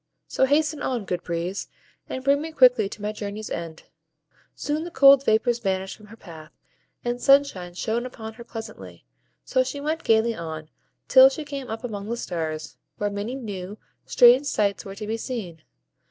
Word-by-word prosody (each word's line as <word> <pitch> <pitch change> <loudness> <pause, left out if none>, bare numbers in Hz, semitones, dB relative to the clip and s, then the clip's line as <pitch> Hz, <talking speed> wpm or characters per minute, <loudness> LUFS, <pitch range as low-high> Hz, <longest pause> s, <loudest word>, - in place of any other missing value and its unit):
So 265 - +2
hasten 300 +2 +1
on, 240 -5 -2
good 180 -2 -3
Breeze, 170 +3 -4 0.4
and 260 - -5
bring 280 +1 +3
me 320 +1 -5
quickly 250 -8 +5
to 205 - -10
my 210 - -1
journey's 210 0 -6
end." 165 -1 -6 0.7
Soon 300 +2 -2
the 345 - -6
cold 275 -3 +7
vapors 235 0 +2
vanished 190 -3 -2
from 210 - -17
her 225 +2 -13
path, 160 -5 -12 0.5
and 240 0 -2
sunshine 275 -11 +3
shone 225 +5 -1
upon 220 -3 -9
her 235 - -11
pleasantly; 225 -1 -9 0.4
so 260 - +2
she 265 +2 -5
went 310 +3 -2
gayly 225 +1 +3
on, 160 -4 -7 0.4
till 260 +1 +8
she 300 +3 -6
came 280 -3 -6
up 225 +3 -5
among 210 -3 -5
the 235 - -2
stars, 160 -6 -4 0.2
where 205 0 -1
many 205 +5 -4
new, 205 -5 -6 0.3
strange 250 +4 +6
sights 205 -7 0
were 195 0 -8
to 210 +1 -6
be 220 +2 -2
seen. 210 - -6
225 Hz, 180 wpm, -24 LUFS, 195-265 Hz, 0.7 s, till